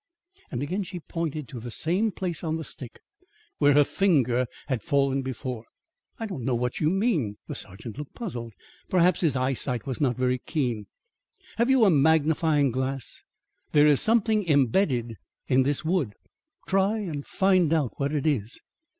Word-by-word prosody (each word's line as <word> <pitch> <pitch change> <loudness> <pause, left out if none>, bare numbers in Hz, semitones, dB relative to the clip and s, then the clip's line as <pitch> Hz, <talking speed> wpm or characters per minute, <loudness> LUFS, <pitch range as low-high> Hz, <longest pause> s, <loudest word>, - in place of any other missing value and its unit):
And 120 +2 -3
again 185 +8 -2
she 180 -1 -6
pointed 155 -4 -4
to 125 - -7
the 120 +2 -7
same 185 - 0
place 180 -4 -3
on 160 -1 -1
the 160 - -4
stick 125 -5 -10 0.6
where 145 -1 +5
her 145 - +7
finger 130 -9 +2 0.2
had 130 -5 -2
fallen 140 -3 +1
before. 125 -2 -5 0.5
"I 225 - -4
don't 185 - -5
know 125 0 0
what 125 +1 -2
you 155 - +2
mean." 170 - 0
The - - -5
sergeant 105 +6 -8
looked 150 - -8
puzzled. 120 - -6 0.3
Perhaps, 180 -1 +3
his 155 -6 +2
eyesight 130 -1 -1
was 130 -1 -4
not 125 -4 +1
very 125 0 +1
keen. 120 - -2 0.7
"Have 235 +2 +2
you 265 -4 +5
a 195 - +5
magnifying 155 -1 +3
glass? 130 0 -4 0.5
There 150 0 +6
is 150 -2 +5
something 220 -3 +2
embedded 130 - +2 0.3
in 130 +1 +4
this 145 +3 0
wood. 155 - 0 0.5
Try 195 +3 +2
and 165 -9 -4
find 185 -4 +2
out 155 -7 +1
what 140 0 0
it 150 -2 -1
is." 120 -8 -1
145 Hz, 165 wpm, -26 LUFS, 125-175 Hz, 0.7 s, her